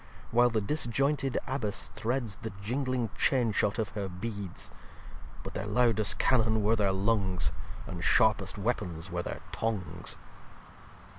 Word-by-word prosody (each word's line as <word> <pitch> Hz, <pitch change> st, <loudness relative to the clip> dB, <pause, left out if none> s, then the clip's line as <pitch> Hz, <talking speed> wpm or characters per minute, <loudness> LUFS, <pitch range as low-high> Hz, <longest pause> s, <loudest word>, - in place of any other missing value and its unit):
While 120 Hz, +1 st, +5 dB
the 110 Hz, -2 st, 0 dB
disjointed 135 Hz, +2 st, +1 dB
Abbess 120 Hz, -6 st, -2 dB
threads 115 Hz, -2 st, -1 dB
The 110 Hz, -, -5 dB
gingling 125 Hz, -1 st, -1 dB
Chain 125 Hz, -5 st, +2 dB
shot 100 Hz, +1 st, +1 dB
of 110 Hz, -3 st, -1 dB
her 100 Hz, -2 st, -4 dB
Beads. 95 Hz, 0 st, -5 dB, 0.7 s
But -, -, -6 dB
their -, -, -3 dB
lowd'st 110 Hz, -1 st, +3 dB
Cannon 110 Hz, -4 st, +3 dB
were 110 Hz, +2 st, +4 dB
their 100 Hz, -3 st, +2 dB
Lungs; 95 Hz, -2 st, +1 dB, 0.3 s
And -, -, -6 dB
sharpest -, -, +3 dB
Weapons 90 Hz, -6 st, -2 dB
were 85 Hz, 0 st, -1 dB
their 80 Hz, -, -5 dB
Tongues. 95 Hz, -7 st, -2 dB
110 Hz, 135 wpm, -30 LUFS, 100-120 Hz, 0.7 s, While